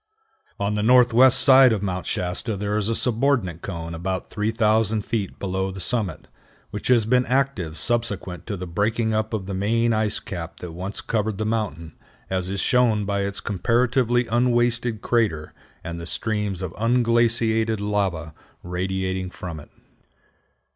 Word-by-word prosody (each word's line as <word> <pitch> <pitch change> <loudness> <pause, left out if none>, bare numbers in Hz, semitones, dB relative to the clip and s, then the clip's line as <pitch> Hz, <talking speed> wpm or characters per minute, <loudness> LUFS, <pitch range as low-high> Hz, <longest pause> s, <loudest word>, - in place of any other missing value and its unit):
On 100 +1 0
the 105 - -1
northwest 125 +2 +6
side 130 -2 +7
of 105 -3 -1
Mount 95 -2 -3
Shasta 90 +5 -2
there 105 +1 -2
is 105 0 0
a 115 - 0
subordinate 115 - +1
cone 85 -3 -6
about 95 +3 -4
3000 110 0 +1
feet 105 -4 -3
below 95 0 -2
the 95 0 -7
summit, 95 -5 -1 0.4
which, 105 - -5
has 120 -4 +4
been 125 +3 +3
active 125 - -1
subsequent 105 -7 0
to 105 -3 -3
the 90 - -5
breaking 110 +6 0
up 110 0 -1
of 105 -4 -3
the 100 - -5
main 115 +4 +1
ice 110 -1 0
cap 85 -3 -7
that 90 - -6
once 95 +5 -5
covered 110 -2 -2
the 110 - -2
mountain, 100 -8 -3 0.4
as 95 -1 -1
is 100 -1 -2
shown 115 -5 +2
by 100 0 -1
its 100 0 -3
comparatively 120 +4 +1
unwasted 120 -1 +1
crater 105 -11 0 0.3
and 85 0 -6
the 85 - -7
streams 105 -4 -2
of 90 -2 -5
unglaciated 115 -2 +2
lava 95 -6 -2 0.3
radiating 95 +1 -3
from 85 -3 -7
it. 75 - -14
105 Hz, 155 wpm, -23 LUFS, 95-115 Hz, 0.4 s, side